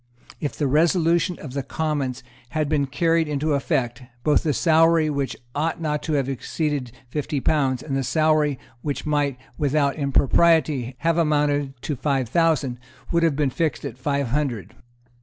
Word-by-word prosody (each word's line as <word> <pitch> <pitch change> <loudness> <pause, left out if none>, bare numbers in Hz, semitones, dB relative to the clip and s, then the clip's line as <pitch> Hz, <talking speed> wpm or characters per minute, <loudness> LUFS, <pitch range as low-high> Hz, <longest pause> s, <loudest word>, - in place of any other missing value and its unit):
If 145 - -3
the 150 - -1
resolution 165 +4 +2
of 135 -4 -9
the 140 - -1
Commons 135 -3 -2 0.3
bad 155 -1 +1
been 145 -2 +1
carried 165 +4 +1
into 150 +1 0
effect, 125 -3 -1 0.2
both 150 -1 +3
the 155 - 0
salary 165 +1 +4
which 140 -2 -2 0.2
ought 160 +3 -1
not 150 -2 -1
to 155 +1 -3
have 140 -3 +1
exceeded 135 0 -2 0.2
fifty 145 +1 -2
pounds, 135 -3 +1
and 140 -3 -3
the 135 - +1
salary 155 0 +2 0.2
which 145 +1 -3
might 145 -3 0 0.2
without 145 -1 +1
impropriety 140 -2 +2
have 165 0 +2
amounted 145 -4 +1
to 150 - -2
five 135 -2 -1
thousand, 150 -5 +1 0.3
would 170 - +2
have 165 -4 +2
been 145 -2 +1
fixed 160 +3 -1
at 120 - -6
five 140 -1 -1
hundred. 130 -6 -2
145 Hz, 160 wpm, -23 LUFS, 135-155 Hz, 0.3 s, salary